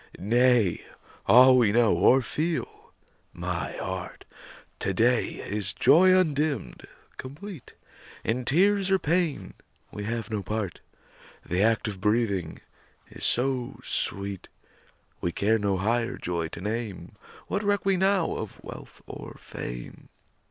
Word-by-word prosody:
Nay! 120 -2 +3 0.4
all 130 +1 +8
we 110 -4 +4
know, 115 0 +4
or 125 +9 +5
feel, 160 +6 -3 0.4
my - - -3
heart, - - -6 0.5
To 95 - -1
day 120 +3 +3 0.2
is 100 -1 -3
joy 170 +8 +6
undimmed, 150 - -1 0.3
complete; 150 - -9 0.5
In 125 +3 -1
tears 195 +8 +3
or 190 - +4
pain 170 -3 -1 0.4
we 105 - -6
have 115 -1 -3
no 105 -2 -1
part; 100 -1 -4 0.7
The 90 +2 0
act 110 0 +2
of 100 -3 -6
breathing 105 -6 0 0.5
is - - -11
so 125 0 -1
sweet, 100 -1 -4 0.7
We 85 - -1
care 110 +5 +1
no 100 -2 0
higher 115 +5 0
joy 85 -2 -2
to 85 - -9
name. 105 -3 -4 0.3
What 200 - -2
reck 205 -2 0
we 195 -1 +3
now 190 -2 +2
of 110 - -7
wealth - - -11
or - - -9
fame? - - -8
115 Hz, 130 wpm, -27 LUFS, 100-145 Hz, 0.7 s, all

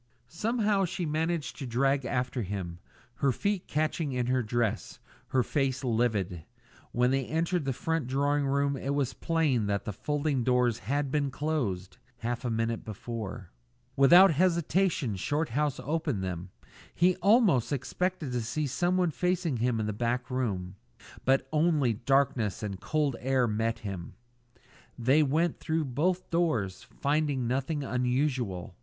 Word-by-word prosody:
Somehow 210 - +1
she 180 0 -3
managed 160 +1 -2
to 135 - -4
drag 135 +3 +1
after 125 +1 -1
him, 90 -4 -4 0.4
her 140 - +2
feet 200 - -1
catching 155 -1 -1
in 125 -1 0
her 130 +1 +1
dress, 115 -1 -1 0.3
her 130 -1 +2
face 135 0 -1
livid. 110 -8 0 0.5
When 125 +1 +2
they 135 -1 0
entered 165 +1 0
the 135 - 0
front 160 +1 -2
drawing 140 +2 +1
room 140 +1 +1
it 135 +1 -2
was 135 -3 0
plain 150 -10 +1
that 100 -1 -1
the 105 - -3
folding 145 +2 -1
doors 125 -2 +2
had 140 +6 -1
been 145 -1 +1
closed 130 -11 -2 0.2
half 120 0 -3
a 125 - -1
minute 115 0 -1
before. 110 -3 -6 0.4
Without 175 +8 +8
hesitation 170 - +1
Shorthouse 145 - -1
opened 150 - -2
them. 90 0 -4 0.5
He 180 +1 +4
almost 195 - +4
expected 160 +2 -2
to 125 -1 -1
see 145 +7 -2
someone 175 +5 +1
facing 180 -4 0
him 120 0 +1
in 110 - -1
the 105 - -2
back 120 +3 -2
room; 100 -7 -2 0.5
but 135 0 +3
only 150 -6 +3
darkness 120 -3 +1
and 100 -3 -4
cold 150 -5 0
air 130 -1 +2
met 110 +1 0
him. 95 -4 -6 0.8
They 130 +6 +4
went 155 +4 +1
through 160 -1 -1
both 175 +8 0
rooms, 120 - 0
finding 145 -3 -1
nothing 135 +4 -1
unusual. 125 -8 -1
135 Hz, 145 wpm, -29 LUFS, 115-155 Hz, 0.8 s, Without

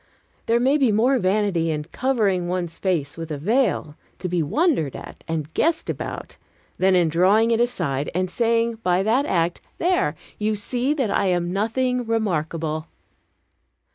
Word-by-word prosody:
There 230 +1 +3
may 270 +5 +3
be 260 -5 +3
more 245 +5 +3
vanity 185 -4 +1
in 150 -1 -2
covering, 200 - 0
one's 175 -2 -3
face 165 -7 -1
with 165 -1 -6
a 150 - -3
veil, 195 - 0 0.2
to 185 - -4
be 175 -1 0
wondered 165 - +1
at - - -10
and 160 -1 -3
guessed 330 0 +1
about, - - -7 0.4
than 190 0 +4
in 175 -2 +4
drawing 195 +8 +3
it 230 - +2
aside, 170 - -1
and 185 +1 +1
saying 230 +2 0
by 180 0 +2
that 250 +8 +2
act, 170 -1 0 0.2
"There! 345 - +1 0.2
you 215 0 0
see 245 +7 -1
that 260 -8 0
I 195 - +1
am 175 -1 0
nothing 245 +4 0
remarkable." 160 -7 -1
195 Hz, 160 wpm, -23 LUFS, 165-235 Hz, 0.4 s, than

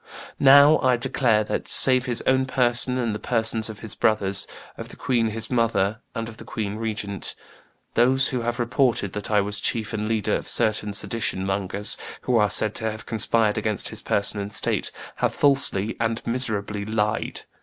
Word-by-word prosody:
Now, 140 +3 +7
I 130 -2 +2
declare 115 -2 +1
that, 105 - -4
save 130 -1 +4
his 120 -2 0
own 130 0 +2
person 125 0 +1
and 120 -4 -1
the 105 - -5
persons 110 -2 0
of 105 -2 -10
his 110 - -2
brothers, 100 -3 0 0.3
of - - -9
the - - -12
queen 115 -3 0
his 110 +1 -4
mother 110 -3 0 0.2
and 115 -1 -4
of 110 -1 -10
the - - -10
queen 105 -5 -5
regnant, 110 -3 -4 0.6
those 130 +3 +3
who 125 -2 -3
have 120 +1 -3
reported 120 -4 0
that 105 +2 -4
I 105 -1 +3
was 100 +1 -1
chief 115 -1 -1
and 105 0 -3
leader 110 -2 -1
of - - -5
certain 105 -1 +4
sedition 105 -3 -1
mongers, 95 +1 0 0.2
who 125 - -1
are 105 -2 +3
said 105 +3 +2
to 110 - -1
have 110 +1 -8
conspired 110 -1 +1
against 105 -2 0
his - - -4
person 100 +1 0
and 100 0 -5
state, - - -1 0.3
have - - -1
falsely 135 -7 +2
and 115 0 -2
miserably 110 -4 -2
lied. 105 +1 -2
110 Hz, 185 wpm, -23 LUFS, 105-120 Hz, 0.6 s, Now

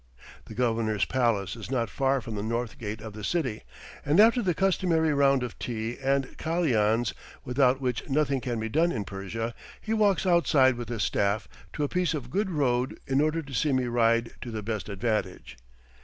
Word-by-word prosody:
The 110 - -10
Governor's 115 -4 +1
palace 115 -7 0
is 110 -3 -8
not 120 -3 0
far 135 +3 0
from 115 - -7
the 105 - -3
north 115 +3 -3
gate 110 -1 -5
of 110 -2 -8
the 105 0 -8
city, 130 - -1 0.4
and 150 +6 +2
after 230 +3 +6
the 180 -6 0
customary 170 -4 +2
round 140 -2 +3
of 120 - -6
tea 115 0 -3
and 135 0 0
kalians, 120 -9 +1 0.3
without 130 +1 +2
which 125 0 -3
nothing 140 -2 +1
can 120 -2 -2
be 110 - -2
done 160 +9 +2
in 105 -8 -3
Persia, 105 +4 -4 0.3
he 220 - -3
walks 205 -3 +2
outside 155 -7 +4
with 120 -1 -7
his 115 -4 -2
staff 100 +1 0 0.3
to 150 - -2
a - - +1
piece 180 0 0
of 125 -4 -6
good 200 +3 0
road 130 -6 0
in 135 +1 +2
order 155 +2 0
to 140 -1 -11
see 145 +2 +1
me 130 -1 +2
ride 115 -1 +2
to 120 - -6
the 110 -2 -5
best 110 0 -4
advantage. 100 - -2
125 Hz, 195 wpm, -27 LUFS, 110-150 Hz, 0.4 s, after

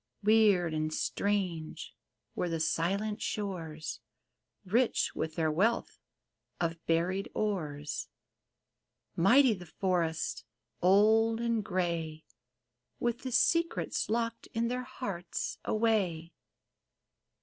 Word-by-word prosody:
Weird 205 -6 +4
and 155 0 -1
strange 180 -2 -2 0.4
were 175 - -1
the 165 -1 -1
silent 195 +7 0
shores, 165 -8 -4 0.7
Rich 230 +6 +2
with 160 0 -3
their 160 -2 +1
wealth 215 +9 +1 0.6
of 165 -1 -2
buried 175 +4 +1
ores; 155 -9 -2 1.1
Mighty 240 +8 +6
the 180 -3 -9
forests, 170 -2 -1 0.4
old 220 +4 +5
and 230 -2 0
gray, 170 -4 -2 0.7
With 240 0 0
the 260 -1 -5
secrets 335 +7 +1
locked 230 +1 -1
in 230 +1 +1
their 250 +1 -2
hearts 200 -9 -4
away. 195 -7 0
190 Hz, 95 wpm, -31 LUFS, 165-225 Hz, 1.1 s, Mighty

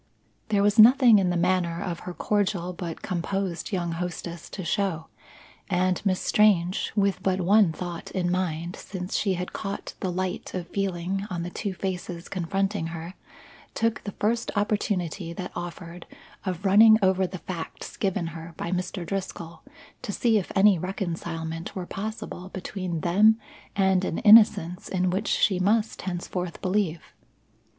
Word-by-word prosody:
There 205 -2 +3
was 205 +2 +3
nothing 240 -1 +8
in 185 -2 +1
the 175 - 0
manner 175 -1 +1
of 170 -3 -4
her 180 - -7
cordial 190 -4 0
but 170 -2 -6
composed 185 -1 -2
young 175 -3 -1
hostess 170 0 -5
to 190 - -6
show, 175 -3 -1 0.6
and 185 -1 +1
Miss 185 -2 +1
Strange, 190 -4 +2
with 200 -2 +1
but 190 0 +1
one 195 0 +4
thought 175 0 -6
in 175 -2 -1
mind 175 -1 -2
since 185 -1 -6
she 195 -3 +1
had 180 +1 -5
caught 200 -1 -5
the 185 - -2
light 185 +1 -3
of 175 -2 -4
feeling 195 0 -2
on 175 -2 -3
the 175 - -5
two 200 -1 -4
faces 180 -2 -4
confronting 195 0 -1
her, 165 +1 -7 0.6
took 225 0 0
the 205 - -5
first 230 +2 0
opportunity 195 -4 -1
that 180 +1 -6
offered 175 0 -7 0.4
of 185 +1 -3
running 220 +3 +8
over 190 0 +3
the 185 - -7
facts 170 -2 -7
given 195 -3 -1
her 165 0 -9
by 170 - -4
Mr. 180 0 -3
Driscoll, 180 -2 -5 0.4
to - - -4
see 225 +1 +2
if 185 - -6
any 195 -2 +5
reconcilement 165 -3 -4
were 185 -2 -4
possible 195 -2 -6
between 185 -3 -4
them 215 +7 +4 0.4
and 190 -1 +3
an 170 - -2
innocence 210 -4 +6
in 185 -1 +1
which 195 +4 -1
she 190 -4 +2
must 215 +4 +1
henceforth 180 -1 -4
believe. 185 -4 0
185 Hz, 155 wpm, -26 LUFS, 175-200 Hz, 0.6 s, nothing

